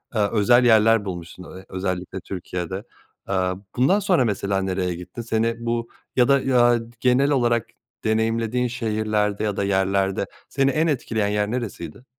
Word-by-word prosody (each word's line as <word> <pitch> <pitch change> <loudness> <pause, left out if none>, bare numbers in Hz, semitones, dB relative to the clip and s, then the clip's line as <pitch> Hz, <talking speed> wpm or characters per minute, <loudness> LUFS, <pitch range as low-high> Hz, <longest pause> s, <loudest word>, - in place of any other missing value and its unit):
eee 110 - +2
özel 120 +3 +4
yerler 115 -2 +5
bulmuşsun 90 -1 -7 0.2
özellikle 95 0 -3
Türkiye'de. 90 +1 -5 0.5
Eee, - - 0 0.4
bundan 155 +12 +3
sonra 180 -10 +2
mesela 100 -2 -1
nereye 90 -2 -1
gittin? 90 +6 -8
Seni 115 0 0
bu 115 0 -1 0.3
ya 125 -2 +4
da, 140 -1 +4
eee, 120 -2 +4 0.2
genel 130 +3 +3
olarak 120 -4 +2 0.4
deneyimlediğin 115 +2 0
şehirlerde 110 -3 -1
ya 105 -2 -1
da - - 0
yerlerde 95 0 +1 0.2
seni 135 0 +2
en 160 +4 +1
etkileyen 115 -7 0
yer 105 0 0
neresiydi? 115 -5 -5
110 Hz, 145 wpm, -23 LUFS, 95-120 Hz, 0.5 s, yerler